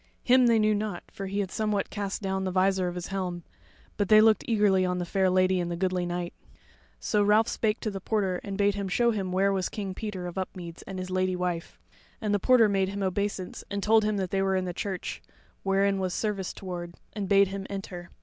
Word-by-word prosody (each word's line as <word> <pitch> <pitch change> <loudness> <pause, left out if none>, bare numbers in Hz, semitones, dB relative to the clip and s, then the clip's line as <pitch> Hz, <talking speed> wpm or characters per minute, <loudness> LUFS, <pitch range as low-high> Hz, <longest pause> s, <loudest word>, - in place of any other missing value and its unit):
Him 255 0 +5
they 230 -1 +5
knew 215 0 +3
not, 205 -4 -3
for 195 - -6
he 200 +2 -1
had 190 -2 -4
somewhat 210 -2 -1
cast 200 0 -4
down 190 0 -1
the 190 - -1
visor 185 0 +2
of 175 - -4
his 175 -1 -5
helm; 180 -3 -3 0.5
but 205 -2 0
they 215 - +8
looked 220 0 +5
eagerly 205 -4 +3
on 180 0 0
the 175 - -2
fair 190 +1 +2
lady 185 0 +3
and 175 -1 -2
the 170 - -2
goodly 180 0 0
knight. 175 0 -3 0.7
So 210 - +1
Ralph 210 +2 +4
spake 215 -1 0
to 215 - -2
the 195 -1 -6
porter 190 -3 0
and 200 -2 -5
bade 205 0 +3
him 200 -1 -3
show 235 +6 +2
him 195 -4 -2
where 195 +2 +2
was 190 -2 -1
King 195 -3 -4
Peter 195 -3 -5
of 175 +2 -4
Upmeads 175 -3 -6
and 195 - -6
his 185 0 -5
Lady 185 0 +1
wife; 180 -2 -3 0.4
and 210 -2 -1
the 205 - +2
porter 240 +1 +5
made 195 -2 +1
him 200 0 -3
obeisance 190 0 -2
and 200 -1 -3
told 220 +1 +5
him 210 -1 0
that 190 -2 -2
they 195 - +1
were 195 0 +1
in 185 -1 0
the 180 - -3
church, 190 0 -4 0.4
wherein 195 0 +2
was 185 -1 -1
service 205 -4 -2
toward; 175 -2 -7 0.2
and 205 -3 -4
bade 200 -1 +5
him 195 0 -5
enter. 185 -3 -6
195 Hz, 235 wpm, -28 LUFS, 185-205 Hz, 0.7 s, they